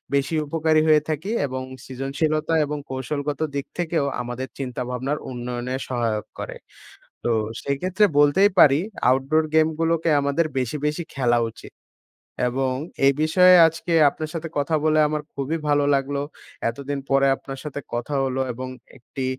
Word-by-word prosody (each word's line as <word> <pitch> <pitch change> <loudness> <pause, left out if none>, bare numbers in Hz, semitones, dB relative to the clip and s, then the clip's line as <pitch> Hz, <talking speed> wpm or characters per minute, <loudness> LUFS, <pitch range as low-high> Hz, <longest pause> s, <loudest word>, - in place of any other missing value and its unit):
বেশি 140 +4 0
উপকারী 155 0 +2
হয়ে 155 -1 +5
থাকি 155 +6 -3 0.2
এবং 130 -1 -4 0.2
সৃজনশীলতা 150 +5 -1
এবং 150 +1 -4
কৌশলগত 140 +2 -3 0.2
দিক 140 0 -2
থেকেও 165 -4 0 0.2
আমাদের 125 +2 -5
চিন্তাভাবনার 125 +2 -3
উন্নয়নে 125 +1 -4
সহায়ক 115 -4 -1
করে। - - -5 0.7
তো - - 0 0.3
সেক্ষেত্রে 180 +9 +1
বলতেই 170 +8 +5
পারি 140 0 +7 0.3
আউটডোর 135 +5 +2
গেমগুলোকে 160 +1 +2
আমাদের 140 +4 +1
বেশি, 130 +3 -1
বেশি 150 +3 -1
খেলা 120 -3 +2
উচিত। 115 - -13 0.8
এবং 130 +1 0 0.3
এই 140 - +6
বিষয়ে 180 +3 +6
আজকে 165 +1 -3 0.2
আপনার 155 +2 -6
সাথে 165 0 -4
কথা 145 +3 +1
বলে 155 0 +3
আমার 150 0 -2
খুবই 140 +4 -2
ভালো 145 0 +3
লাগলো। 140 +1 -1 0.5
এতদিন 140 +3 -4
পরে 135 0 +4
আপনার 135 0 -9
সাথে 145 -1 -5
কথা 120 +5 -3
হলো 130 0 -1
এবং 130 +2 -6 0.3
একটি 130 +2 -6
140 Hz, 140 wpm, -23 LUFS, 130-155 Hz, 0.8 s, পারি